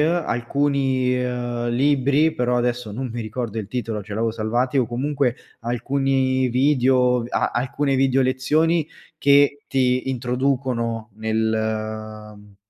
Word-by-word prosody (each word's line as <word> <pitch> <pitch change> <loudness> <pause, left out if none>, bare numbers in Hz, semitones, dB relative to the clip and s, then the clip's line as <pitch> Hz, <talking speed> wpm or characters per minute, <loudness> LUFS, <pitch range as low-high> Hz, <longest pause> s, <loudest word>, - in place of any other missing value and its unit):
alcuni, 140 -4 +1
uhm, 120 -1 -3
libri, 140 +4 +2
però 125 0 0
adesso 120 -2 -1
non 125 +3 -4
mi 120 - -4
ricordo 115 0 -4
il 105 -2 -5
titolo, 115 -3 -3
ce 100 +1 -8
l’avevo 115 0 0
salvati, 120 +5 -1
o 125 -3 +3
comunque 130 +1 -1 0.2
alcuni 130 +2 0
video, 125 -1 +3
ve 120 - -7
a - - 0
alcune 135 +3 0
videolezioni, 135 +5 +2 0.3
che 145 0 +4
ti 130 -1 +1
introducono 125 -3 -1
nel 110 -1 -2
mhmm, 105 -1 -17
125 Hz, 125 wpm, -22 LUFS, 115-135 Hz, 0.3 s, che